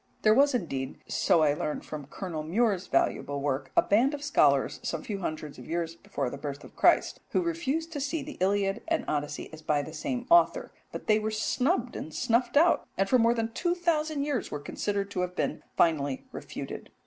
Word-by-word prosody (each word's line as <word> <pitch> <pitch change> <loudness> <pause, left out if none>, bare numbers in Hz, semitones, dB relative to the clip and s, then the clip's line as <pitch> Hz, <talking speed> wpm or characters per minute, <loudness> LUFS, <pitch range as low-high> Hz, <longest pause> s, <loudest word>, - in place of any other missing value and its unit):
There 215 - +6
was, 280 +3 +4
indeed, 135 - -3
so 165 - +3
I 145 -2 +4
learn 150 0 -3
from 150 -3 -7
Colonel 170 -2 -5
Mure's 195 +3 +1
valuable 140 +1 0
work, 135 -1 -2
a - - +7
band 250 +8 +3
of 290 - -8
scholars 295 -1 +3
some - - -3
few 205 -2 -4
hundreds 155 -5 -5
of 125 - -11
years 165 0 -2
before 140 -5 -4
the 140 - -7
birth 140 -1 -5
of - - -14
Christ, - - +3
who - - +2
refused 330 -1 -2
to 290 - -3
see 290 +2 -2
the 300 +1 -9
Iliad 195 +2 +1
and 330 -1 0
Odyssey 150 +1 -3
as 160 - -9
by 150 -2 +1
the 155 - -9
same 245 +10 -3
author, 345 0 +4 0.2
but - - -7
they 215 0 +4
were 215 0 -1
snubbed 245 +3 0
and 155 - -6
snuffed 240 - +1
out, 335 +3 +4
and 195 +1 +2
for 255 +4 +4
more 230 +1 +4
than 225 -1 -2
two 350 0 0
thousand 315 -4 0
years 285 -6 -1
were 145 - -4
considered 200 +6 -3
to 190 - -3
have 180 0 -2
been - - -1 0.2
finally 145 -5 +2
refuted. - - -7
200 Hz, 210 wpm, -28 LUFS, -, 0.2 s, a